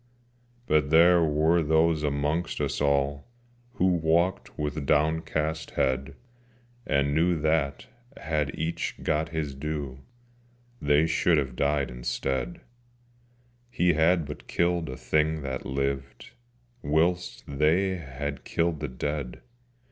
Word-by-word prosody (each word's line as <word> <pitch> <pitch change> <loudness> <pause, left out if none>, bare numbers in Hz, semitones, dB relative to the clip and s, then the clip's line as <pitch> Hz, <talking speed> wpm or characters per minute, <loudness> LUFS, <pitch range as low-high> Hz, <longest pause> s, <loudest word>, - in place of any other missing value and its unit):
But 75 - +2
there 85 +2 +6
were 80 +2 +3
those 80 0 +2
amongst 75 +3 -1
us - - -2
all 70 +1 +1 0.5
Who 95 - 0
walked 85 +1 +1
with 75 -1 -3
downcast 80 +1 0
head, 65 0 0 0.7
And 70 0 +1
knew 85 +2 +2
that, 75 -3 0 0.3
had 75 -2 -1
each 80 +2 -2
got 75 +1 0
his 80 -4 -3
due, 70 -2 -5 0.8
They 75 +2 +3
should 80 +1 +2
have 65 -4 -1
died 70 0 0
instead: 65 - -3 1.1
He 90 -6 +2
had 80 +1 +3
but 75 +1 -9
killed 85 -3 0
a 65 - -6
thing 80 0 0
that 65 -2 -4
lived, 70 0 -3 0.5
Whilst 85 +3 0
they 80 +7 +1
had 70 -2 -6
killed 85 -2 -1
the 75 - -3
dead. 70 0 -4
75 Hz, 120 wpm, -27 LUFS, 70-80 Hz, 1.1 s, there